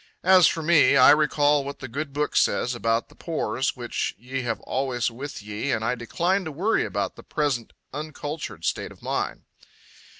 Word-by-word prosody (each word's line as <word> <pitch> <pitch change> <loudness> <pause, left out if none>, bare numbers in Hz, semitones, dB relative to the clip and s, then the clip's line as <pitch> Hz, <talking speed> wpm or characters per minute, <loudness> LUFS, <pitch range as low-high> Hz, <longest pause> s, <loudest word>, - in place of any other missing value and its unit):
As 185 -1 +7
for 165 - -1
me, 155 -3 +5
I 130 - +8
recall 150 -1 +3
what 140 +1 -6
the 130 - -7
Good 140 +4 -4
Book 150 +1 -2
says 125 - +2
about 115 -1 0
the - - -17
pores 135 -6 -2
which 120 -2 -3
ye 130 +4 -4
have 115 -3 -2
always 125 -3 -1
with 130 -1 -7
ye, 105 +6 -3
and 110 0 -1
I 115 - +1
decline 170 - 0
to 160 - -4
worry 190 +10 +1
about 100 -1 -3
the - - -10
present 140 -6 -1 0.2
uncultured 150 +1 -6
state - - -2
of - - -17
mine. - - -2
140 Hz, 185 wpm, -25 LUFS, 120-150 Hz, 0.2 s, I